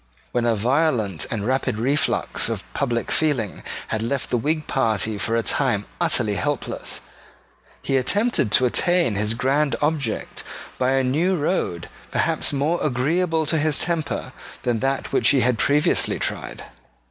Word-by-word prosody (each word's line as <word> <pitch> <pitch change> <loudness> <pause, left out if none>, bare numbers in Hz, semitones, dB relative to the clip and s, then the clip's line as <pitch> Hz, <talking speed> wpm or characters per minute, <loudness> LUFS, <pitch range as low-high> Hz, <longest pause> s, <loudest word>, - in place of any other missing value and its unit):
When 120 -1 0
a 115 - +3
violent 115 - +1
and 105 -3 -3
rapid 130 -3 0
reflux 140 +6 +1
of - - -3
public 120 -4 -1
feeling 140 -10 0 0.3
had 110 - -1
left 125 +3 -2
the 120 - +2
Whig 155 +5 -1
party 110 -5 0
for 115 +3 0
a 115 - +1
time 115 -8 0 0.2
utterly 120 -11 +2
helpless, 145 -2 -3 0.8
he 135 - +1
attempted 185 - +1
to 130 - +5
attain 175 - +2
his 105 +2 0
grand 140 +4 +1
object 145 -7 -2 0.4
by 130 +1 +2
a 135 0 +2
new 160 +9 +1
road 145 - -1 0.2
perhaps - - 0
more 145 +5 0
agreeable 160 +5 +1
to 160 +1 0
his 155 -1 +1
temper 165 -4 -2 0.3
than 120 -2 0
that 135 +2 -2
which - - +4
he 135 - +4
had 125 -3 +1
previously 145 +6 +3
tried. - - -4
135 Hz, 150 wpm, -23 LUFS, 115-155 Hz, 0.8 s, to